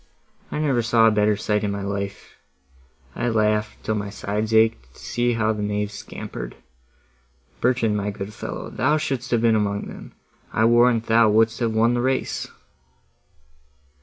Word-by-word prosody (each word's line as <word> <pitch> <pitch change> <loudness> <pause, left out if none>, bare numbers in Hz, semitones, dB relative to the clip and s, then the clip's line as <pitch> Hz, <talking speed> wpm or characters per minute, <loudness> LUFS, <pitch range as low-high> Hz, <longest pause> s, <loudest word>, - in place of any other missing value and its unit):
I - - -3
never 140 -5 +1
saw 115 0 +3
a 110 - +6
better 105 0 +2
sight 105 0 0
in 105 - 0
my 100 0 -3
life; 100 0 -5 0.8
I 120 - -1
laughed, 105 -1 0
till 110 - -1
my 105 -1 -3
sides 105 +2 -3
aked, 110 - +2
to - - -16
see 120 0 -1
how 110 -1 +1
the 105 - -5
knaves 105 0 -2
scampered. - - -7 1.0
Bertrand, 120 -3 +1
my 100 0 -2
good 100 +1 -6
fellow, - - -6
thou 130 +7 +1
shouldst 135 -3 -3
have 120 -2 +2
been 115 -1 +4
among 100 -1 0
them; - - -10 0.4
I 110 - +2
warrant 120 0 +4
thou 115 0 +4
wouldst 110 +1 +3
have 115 -2 0
won 115 +2 +3
the 120 - 0
race!" 130 +1 -1
110 Hz, 165 wpm, -23 LUFS, 105-120 Hz, 1.0 s, a